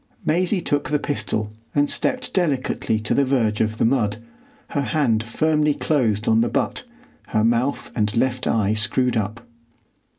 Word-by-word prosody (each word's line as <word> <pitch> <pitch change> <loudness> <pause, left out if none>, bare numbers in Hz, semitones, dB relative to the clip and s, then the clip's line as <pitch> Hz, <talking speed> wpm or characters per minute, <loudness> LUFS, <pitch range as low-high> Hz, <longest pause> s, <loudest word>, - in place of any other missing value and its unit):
Maisie 180 +4 +1
took 145 -3 -1
the 150 - +2
pistol 110 -7 -2 0.2
and 145 0 +3
stepped 255 - -2
delicately 140 - 0
to 105 - -1
the 140 - +3
verge 120 -6 +1
of 110 0 0
the - - +2
mud, 115 -4 +1 0.5
her 145 - -1
hand 130 -6 +1
firmly 150 +5 +1
closed 115 -8 0
on 110 0 +4
the 120 - +1
butt, - - -1 0.5
her 110 -1 +1
mouth 120 +4 0
and 105 0 0
left 125 +1 0
eye 105 -2 +2
screwed 115 +4 0
up. 110 +2 -3
120 Hz, 160 wpm, -22 LUFS, 110-145 Hz, 0.5 s, on